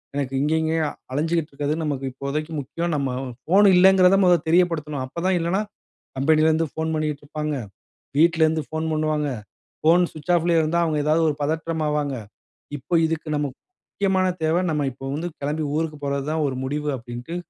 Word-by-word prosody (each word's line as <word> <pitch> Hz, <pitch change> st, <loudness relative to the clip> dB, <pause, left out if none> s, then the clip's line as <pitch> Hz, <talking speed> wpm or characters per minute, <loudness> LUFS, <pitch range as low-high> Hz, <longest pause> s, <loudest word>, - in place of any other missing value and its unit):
எனக்கு 135 Hz, -2 st, -2 dB
இங்கே, 150 Hz, +3 st, +1 dB
இங்கேயே 160 Hz, 0 st, 0 dB, 0.3 s
அலஞ்சுகிட்டு 160 Hz, +3 st, 0 dB
இருக்கிறது 145 Hz, +1 st, -2 dB
நமக்கு 140 Hz, -3 st, -2 dB
இப்போதைக்கு 140 Hz, +4 st, -4 dB
முக்கியம் 165 Hz, +5 st, -3 dB
நம்ம 140 Hz, -2 st, -1 dB, 0.3 s
ஃபோன் 195 Hz, +7 st, +5 dB
இல்லங்கிறத 190 Hz, +1 st, +6 dB
மொத 180 Hz, -1 st, +6 dB
தெரியப்படுத்தணும். 160 Hz, -5 st, +1 dB
அப்பதான் 175 Hz, +8 st, -1 dB
இல்லன்னா 170 Hz, +4 st, 0 dB, 0.6 s
கம்பெனியிலருந்து 155 Hz, +3 st, +3 dB
ஃபோன் 160 Hz, 0 st, -2 dB
பண்ணிட்டு 150 Hz, -2 st, -2 dB
இருப்பாங்க, 150 Hz, 0 st, -3 dB, 0.6 s
வீட்லருந்து 160 Hz, -1 st, +3 dB
ஃபோன் 160 Hz, 0 st, -3 dB
பண்ணுவாங்க. 155 Hz, -1 st, 0 dB, 0.5 s
ஃபோன் 170 Hz, +3 st, +5 dB
ஸ்விட்ச் 155 Hz, +2 st, -4 dB
ஆஃப்லேயே 170 Hz, 0 st, +3 dB
இருந்தா 160 Hz, +2 st, +1 dB
அவுங்க 155 Hz, -2 st, 0 dB
ஏதாவது 155 Hz, +2 st, +3 dB
ஒரு 150 Hz, -, -2 dB
பதற்றம் 160 Hz, +2 st, -1 dB
ஆவாங்க. 150 Hz, -2 st, -1 dB, 0.6 s
இப்ப 165 Hz, +5 st, 0 dB
இதுக்கு 160 Hz, 0 st, -3 dB
நம்ம 145 Hz, 0 st, 0 dB, 0.5 s
முக்கியமான 190 Hz, -2 st, +1 dB, 0.2 s
தேவ 160 Hz, +2 st, +2 dB
நம்ம 150 Hz, -2 st, 0 dB
இப்ப 135 Hz, +1 st, -7 dB
வந்து 165 Hz, +4 st, -3 dB
கெளம்பி 150 Hz, +2 st, -2 dB
ஊருக்கு 155 Hz, -1 st, -2 dB
போறது 140 Hz, -1 st, -1 dB
தான் 160 Hz, 0 st, 0 dB
ஒரு 135 Hz, -, -3 dB
முடிவு. 150 Hz, +2 st, -2 dB
அப்பிடின்ட்டு 120 Hz, +7 st, -7 dB
155 Hz, 160 wpm, -23 LUFS, 145-165 Hz, 0.6 s, இல்லங்கிறத